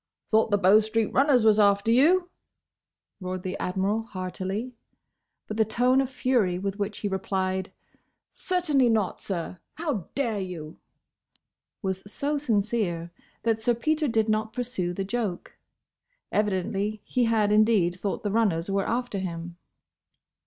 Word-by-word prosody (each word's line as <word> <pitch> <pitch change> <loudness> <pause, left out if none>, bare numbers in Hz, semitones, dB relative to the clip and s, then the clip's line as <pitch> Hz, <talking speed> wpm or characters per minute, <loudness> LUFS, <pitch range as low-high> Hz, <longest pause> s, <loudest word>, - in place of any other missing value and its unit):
"Thought 220 0 +4
the 205 - +3
Bow 200 +2 +6
street 220 0 -1
runners 265 -4 +4
was 215 -1 +5
after 200 +1 +4
you?" 350 +9 +4 0.9
roared 185 -1 -5
the 185 - -3
Admiral 195 +4 0
heartily. 195 +3 -4 0.7
But 215 - -6
the 220 - +5
tone 250 +5 +2
of 265 - -2
fury 245 -9 +1
with 195 +2 -4
which 205 0 -2
he 205 - -3
replied 190 -1 -2 0.6
"Certainly 305 -9 +1
not, 215 -4 0
sir! 180 -1 -4 0.2
How 295 - -3
dare 235 -7 0
you?" 170 -5 -7 1.0
was 190 -1 -2
so 290 +4 -1
sincere 205 - -1 0.3
that 225 -1 +1
Sir 240 +1 +2
Peter 310 +5 0
did 225 -3 +1
not 215 0 0
pursue 240 -8 -2
the 190 +2 -3
joke. 205 -4 -3 0.8
Evidently 205 +1 -1
he 250 -1 +1
had 220 -2 +2
indeed 210 -5 +3
thought 200 - -3
the 205 - -1
runners 195 -5 +1
were 195 0 0
after 240 -4 -1
him. 170 -2 -5
210 Hz, 140 wpm, -26 LUFS, 190-235 Hz, 1.0 s, Bow